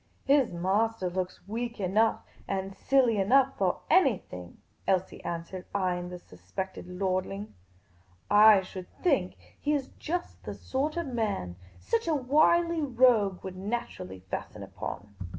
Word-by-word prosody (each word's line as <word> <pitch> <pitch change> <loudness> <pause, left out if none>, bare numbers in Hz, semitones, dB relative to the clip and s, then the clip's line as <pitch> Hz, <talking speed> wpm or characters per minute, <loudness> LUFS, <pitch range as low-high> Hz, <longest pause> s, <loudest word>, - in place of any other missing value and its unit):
" - - -38
His 275 -2 +4
m3* 195 +6 +1
;ter 185 -3 -2
looks 185 0 -4
weak 235 +2 -4
enough 210 +4 +2 0.2
and 195 0 -3
silly 250 -6 +3
enough 265 +7 +4
for - - +1
any 270 - +5
thing," 90 - -11 0.3
Elsie 190 -1 0
answered, 170 +2 -5
eying 180 -2 0
the 180 - -6
suspected 175 - -7
lordling. 185 +2 -2 0.4
" 90 0 -27 0.2
I 200 -2 +5
should 185 0 -8 0.2
think 270 - +1 0.2
he 295 - +1
is 280 -3 -1
just 350 +3 -4
the - - -6
sort 290 +5 -2
of 340 - -1
man 215 - -2 0.2
such 230 - -1
a 320 - +2
wily 315 +5 +3
rogue 240 -8 +3
would 190 -1 -6
naturally 185 - -5
fasten - - -5
upon." 105 - -7
200 Hz, 150 wpm, -29 LUFS, 180-260 Hz, 0.4 s, any